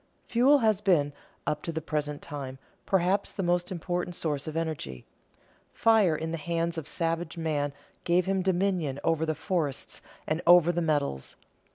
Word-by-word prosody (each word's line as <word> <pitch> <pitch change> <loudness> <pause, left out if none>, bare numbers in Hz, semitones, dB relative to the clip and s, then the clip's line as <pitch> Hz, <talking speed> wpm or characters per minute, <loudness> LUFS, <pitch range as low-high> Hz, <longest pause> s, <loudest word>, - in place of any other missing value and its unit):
Fuel 255 +5 +5
has 215 -5 +2
been, 155 -8 +3 0.3
up 150 0 -1
to 165 - -4
the 160 - -2
present 150 -2 -3
time, 135 -3 -6 0.3
perhaps 190 +1 +2
the 195 - -3
most 175 +1 +1
important 175 0 -3
source 150 -3 -2
of 155 +1 -4
energy. 150 - -4 0.7
Fire 215 -8 +4
in 160 +1 -3
the 165 - -3
hands 170 +1 -1
of 150 - -8
savage 165 +1 -1
man 150 -3 -1 0.3
gave 175 +1 +2
him 190 0 +1
dominion 180 -6 0
over 160 -1 +1
the 155 - 0
forests 155 -3 -2 0.2
and 155 +2 -1
over 175 -1 +7
the 175 0 -1
metals. 145 - -1
165 Hz, 165 wpm, -28 LUFS, 150-180 Hz, 0.7 s, over